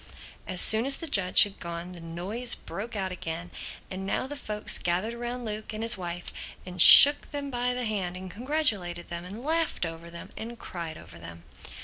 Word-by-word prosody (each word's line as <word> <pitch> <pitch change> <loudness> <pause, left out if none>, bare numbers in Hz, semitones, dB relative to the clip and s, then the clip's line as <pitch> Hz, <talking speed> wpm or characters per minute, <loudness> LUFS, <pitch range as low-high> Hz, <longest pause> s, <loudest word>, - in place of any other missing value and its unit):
As 180 - -1
soon 220 +4 +5
as 275 - +3
the 330 - -7
judge 195 - +5
had 205 -1 -6
gone 170 +1 -8
the 180 - -10
noise 190 +9 -2
broke 225 +3 -9
out 190 -2 -4
again; 170 0 -8 0.4
and 190 0 -7
now 195 - -3
the 290 +2 -8
folks 210 -7 -2
gathered 180 +6 -3
round 240 +1 -7
Luke 215 0 -7
and 215 +1 -6
his 230 +1 +4
wife 175 -2 -7 0.3
and 180 -1 -1
shook 290 +9 +10
them 285 -1 -6
by 245 0 -3
the 250 -1 -4
hand 190 -5 -4
and 185 0 -10
congratulated 210 - -2
them 170 0 -7
and 205 +6 -10
laughed 320 - -2
over 165 +1 -9
them 170 0 -11
and 235 +2 -9
cried 170 -7 -9
over - - -15
them. 85 0 -13
200 Hz, 200 wpm, -26 LUFS, 175-240 Hz, 0.4 s, shook